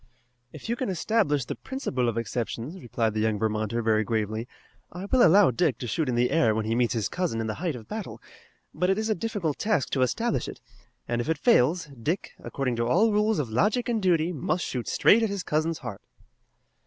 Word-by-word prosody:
"If -, -, -10 dB
you 235 Hz, -, 0 dB
can 250 Hz, -3 st, -3 dB
establish 175 Hz, -, +1 dB
the -, -, -4 dB
principle 135 Hz, -, -2 dB
of 115 Hz, -, -4 dB
exceptions," 120 Hz, -, -4 dB
replied 115 Hz, -2 st, -1 dB
the 110 Hz, -, -2 dB
young 110 Hz, -1 st, +1 dB
Vermonter 110 Hz, +2 st, -1 dB
very 110 Hz, -1 st, +2 dB
gravely, 110 Hz, +1 st, -2 dB, 0.4 s
"I 180 Hz, +3 st, -7 dB
will 255 Hz, +5 st, +2 dB
allow 190 Hz, -, +6 dB
Dick 145 Hz, +2 st, +1 dB
to -, -, -6 dB
shoot 145 Hz, +4 st, -1 dB
in 125 Hz, -, 0 dB
the 120 Hz, +1 st, +2 dB
air 115 Hz, -9 st, +3 dB
when 110 Hz, -1 st, -1 dB
he 110 Hz, -, 0 dB
meets 120 Hz, 0 st, +1 dB
his 110 Hz, -5 st, 0 dB
cousin 175 Hz, -, -2 dB
in 115 Hz, -, -2 dB
the 110 Hz, -, -2 dB
height 170 Hz, -6 st, -1 dB
of 115 Hz, -3 st, -10 dB
battle, 215 Hz, -1 st, -6 dB, 0.5 s
but 180 Hz, -, 0 dB
it 195 Hz, -, +2 dB
is 220 Hz, +1 st, -1 dB
a -, -, +4 dB
difficult 195 Hz, -7 st, -3 dB
task 210 Hz, -10 st, 0 dB
to 130 Hz, -, 0 dB
establish 225 Hz, -, 0 dB
it, -, -, -8 dB, 0.5 s
and 120 Hz, 0 st, -1 dB
if 120 Hz, -, -5 dB
it 160 Hz, -, +1 dB
fails 170 Hz, -, +3 dB, 0.2 s
Dick, 165 Hz, -, -2 dB
according 130 Hz, -4 st, -3 dB
to 115 Hz, 0 st, 0 dB
all 210 Hz, -, +3 dB
rules 210 Hz, 0 st, +2 dB
of 135 Hz, -7 st, -2 dB
logic 210 Hz, -, +1 dB
and 230 Hz, -3 st, 0 dB
duty, 175 Hz, -2 st, +2 dB
must 165 Hz, +4 st, -1 dB
shoot 125 Hz, -3 st, -4 dB
straight 225 Hz, -, +5 dB
at 225 Hz, -, +1 dB
his 200 Hz, -2 st, -3 dB
cousin's 160 Hz, +1 st, 0 dB
heart." 115 Hz, -6 st, -7 dB
150 Hz, 220 wpm, -26 LUFS, -, 0.5 s, allow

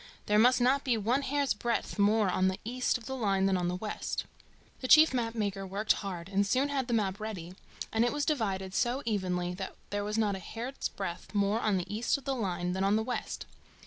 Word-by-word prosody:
There 210 Hz, 0 st, +3 dB
must 250 Hz, +3 st, +5 dB
not 260 Hz, +3 st, +3 dB
be 245 Hz, -4 st, +1 dB
one 235 Hz, +6 st, +1 dB
hair's 280 Hz, 0 st, +1 dB
breadth 230 Hz, 0 st, -2 dB
more 210 Hz, +1 st, +4 dB
on 185 Hz, +1 st, +2 dB
the 190 Hz, 0 st, -1 dB
east 250 Hz, +3 st, 0 dB
of 235 Hz, -, -14 dB
the 265 Hz, -, -4 dB
line 195 Hz, -6 st, +1 dB
than 195 Hz, -1 st, +3 dB
on 180 Hz, -1 st, 0 dB
the 180 Hz, -, -1 dB
west." 210 Hz, +3 st, -3 dB, 0.5 s
The 255 Hz, -, -3 dB
chief 310 Hz, +1 st, +8 dB
map 230 Hz, -2 st, -1 dB
maker 200 Hz, -3 st, -2 dB
worked 200 Hz, +3 st, +1 dB
hard, 180 Hz, -4 st, -5 dB
and 195 Hz, +1 st, +2 dB
soon 260 Hz, +8 st, +1 dB
had 270 Hz, -3 st, -1 dB
the 240 Hz, -, -1 dB
map 200 Hz, -2 st, 0 dB
ready, 190 Hz, -5 st, -6 dB, 0.4 s
and 225 Hz, +1 st, +3 dB
it 240 Hz, -, +2 dB
was 295 Hz, 0 st, -1 dB
divided 195 Hz, -, -1 dB
so 245 Hz, +5 st, 0 dB
evenly 180 Hz, -5 st, -1 dB
that 190 Hz, +1 st, -6 dB, 0.2 s
there 205 Hz, 0 st, -1 dB
was 210 Hz, +1 st, -2 dB
not 210 Hz, -3 st, +2 dB
a -, -, -6 dB
hair's 235 Hz, +8 st, -5 dB
breadth 190 Hz, +1 st, -6 dB
more 205 Hz, +2 st, +2 dB
on 210 Hz, -4 st, +1 dB
the 185 Hz, +3 st, -4 dB
east 230 Hz, +5 st, +1 dB
of 280 Hz, -, -13 dB
the 275 Hz, -, 0 dB
line 180 Hz, -7 st, -2 dB
than 190 Hz, +1 st, -1 dB
on 200 Hz, +2 st, +3 dB
the 220 Hz, -, +1 dB
west. 245 Hz, +2 st, -4 dB
210 Hz, 235 wpm, -30 LUFS, 195-245 Hz, 0.5 s, chief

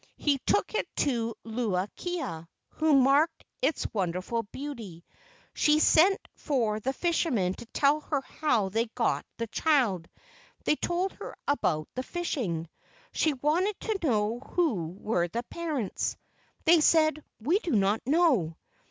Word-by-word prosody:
He 285 Hz, -2 st, +1 dB
took 410 Hz, -, +2 dB
it -, -, 0 dB
to 230 Hz, -4 st, 0 dB
Luu 220 Hz, -5 st, -1 dB
kia, 170 Hz, -, -4 dB, 0.2 s
who 310 Hz, -2 st, +2 dB
marked 285 Hz, +5 st, +3 dB, 0.2 s
its 275 Hz, +3 st, +1 dB
wonderful 185 Hz, +3 st, -1 dB
beauty. 225 Hz, -, -8 dB, 0.5 s
She 300 Hz, 0 st, +4 dB
sent 350 Hz, +5 st, +5 dB
for 230 Hz, -8 st, 0 dB
the 255 Hz, +5 st, -1 dB
fishermen 270 Hz, -, 0 dB
to 235 Hz, -, -11 dB
tell 285 Hz, +5 st, +2 dB
her 295 Hz, -2 st, -2 dB
how 245 Hz, -9 st, 0 dB
they 225 Hz, +4 st, 0 dB
got 240 Hz, -2 st, 0 dB
the 230 Hz, -, -2 dB
child. 225 Hz, -, +1 dB, 0.6 s
They -, -, +3 dB
told 355 Hz, +5 st, -1 dB
her -, -, -9 dB
about 155 Hz, -, +1 dB
the 255 Hz, -, -2 dB
fishing. 250 Hz, -, -3 dB, 0.5 s
She 310 Hz, -, +2 dB
wanted 340 Hz, +10 st, 0 dB
to 435 Hz, -3 st, -2 dB
know 225 Hz, -6 st, +1 dB
who 255 Hz, -, 0 dB
were 175 Hz, -5 st, 0 dB
the 235 Hz, +8 st, -3 dB
parents. 295 Hz, -, -3 dB, 0.5 s
They 335 Hz, +1 st, +7 dB
said: 310 Hz, -1 st, +4 dB, 0.2 s
"We 315 Hz, -, +2 dB
do 350 Hz, -8 st, -3 dB
not 205 Hz, 0 st, +2 dB
know. 270 Hz, -, +3 dB
265 Hz, 140 wpm, -28 LUFS, 210-315 Hz, 0.6 s, They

